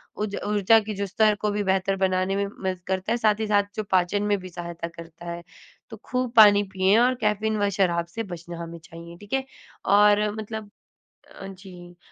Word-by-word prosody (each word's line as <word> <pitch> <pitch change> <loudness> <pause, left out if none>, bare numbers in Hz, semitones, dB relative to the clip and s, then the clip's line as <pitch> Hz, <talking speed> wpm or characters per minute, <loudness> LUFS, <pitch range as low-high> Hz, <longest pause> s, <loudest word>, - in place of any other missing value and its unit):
उज 210 -1 -3
ऊर्जा 210 +2 +4
की 215 0 -5
जो 200 0 -2
स्तर 215 +2 +2
को 210 -1 0
भी 205 0 -1
बेहतर 190 0 +1
बनाने 190 0 0
में 200 0 0
मदद 190 -2 -4
करता 190 +1 -2
है, 235 - +2
साथ 215 -2 +2
ही 220 - -2
साथ 205 -1 +3
जो 215 - -2
पाचन 190 +2 +2
में 205 -1 +1
भी 185 0 -9
सहायता 170 -1 -6
करता 170 0 -12
है। 170 0 -6 0.5
तो - - -9
खूब 250 -1 -2
पानी 205 -2 +8
पिएँ 190 +2 +3
और 250 +1 +3
कैफीन 215 +1 0
व 205 - +2
शराब 170 -2 +2
से 225 - -2
बचना 175 -2 -8
हमें 170 0 -8
चाहिए, 170 +1 -12
ठीक 205 +5 -12
है? 270 0 0 0.4
और 210 +1 +4
मतलब 220 -1 -6 0.7
अ, 195 - -7
जी 180 -2 -12
200 Hz, 205 wpm, -25 LUFS, 180-210 Hz, 0.7 s, पानी